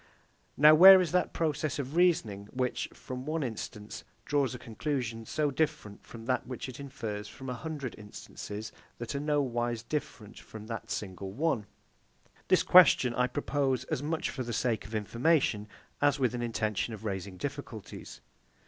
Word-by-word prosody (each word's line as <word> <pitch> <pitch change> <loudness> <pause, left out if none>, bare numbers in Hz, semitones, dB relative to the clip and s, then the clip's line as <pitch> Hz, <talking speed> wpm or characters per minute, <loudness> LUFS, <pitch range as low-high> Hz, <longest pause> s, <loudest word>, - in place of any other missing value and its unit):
Now 150 +2 +8
where 190 +4 +10
is 180 -3 0
that 180 0 +1
process 155 -2 -1
of 140 +1 -4
reasoning 120 - +2
which, 125 -1 -2
from 130 +1 -8
one 155 0 -1
instance, 110 -3 -6 0.2
draws 135 -3 +1
a - - -5
conclusion, 115 -2 -4
so 150 -2 0
different 150 -8 -2
from 115 -1 -11
that 130 +1 -1
which 130 +1 -5
it 130 0 -9
infers 115 -7 -5
from 130 +4 -7
a - - -2
hundred 140 -1 -5
instances 105 +1 -8 0.3
that 120 +3 -5
are 140 - -2
nowise 120 -6 0
different 120 -5 -5
from 110 -1 -10
that 115 0 -6
single 95 -1 -5
one? 120 -3 -1 0.8
This - - +4
question 170 -9 +6
I 125 +1 +2
propose 135 -1 -1
as - - 0
much 155 +2 -2
for 130 - -5
the 120 -1 -4
sake 115 -3 -1
of 110 - -7
information, 115 0 +1 0.3
as 145 0 +4
with 125 -3 +1
an 120 - -3
intention 110 -1 -1
of 110 +1 -12
raising 95 -2 -4
difficulties. - - -7
125 Hz, 165 wpm, -30 LUFS, 110-145 Hz, 0.8 s, where